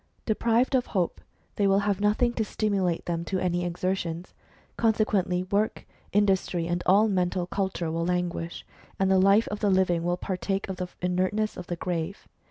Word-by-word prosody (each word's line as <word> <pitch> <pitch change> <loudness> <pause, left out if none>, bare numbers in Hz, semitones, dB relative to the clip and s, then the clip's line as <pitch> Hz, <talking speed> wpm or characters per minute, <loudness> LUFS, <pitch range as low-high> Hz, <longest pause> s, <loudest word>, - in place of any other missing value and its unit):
Deprived 235 +3 +2
of 255 -2 +2
hope, 180 -4 -1 0.4
they 200 - +3
will 195 +1 +4
have 200 -1 0
nothing 215 +4 +2
to 225 - 0
stimulate 195 -5 -1
them 170 -1 -2
to 190 +2 -2
any 175 -1 0
exertions; 175 -1 -3 0.4
conse 220 -1 +2
quently 185 -3 0
work, 210 +2 0 0.3
industry, 190 -4 +1
and 175 +1 -1
all 205 +4 +5
mental 180 -2 0
culture 180 -3 -2
will 165 +1 -1
languish, 175 -1 -2 0.3
and 190 0 +2
the 190 - +5
life 195 +4 +5
of 210 - -4
the 205 - +2
living 185 -3 +2
will 175 +1 0
partake 195 +2 -2
of 190 -1 -5
the 180 0 -3 0.2
inertness 185 +4 0
of 180 - -8
the 175 - -2
grave. 170 +2 -4
190 Hz, 180 wpm, -27 LUFS, 175-205 Hz, 0.4 s, all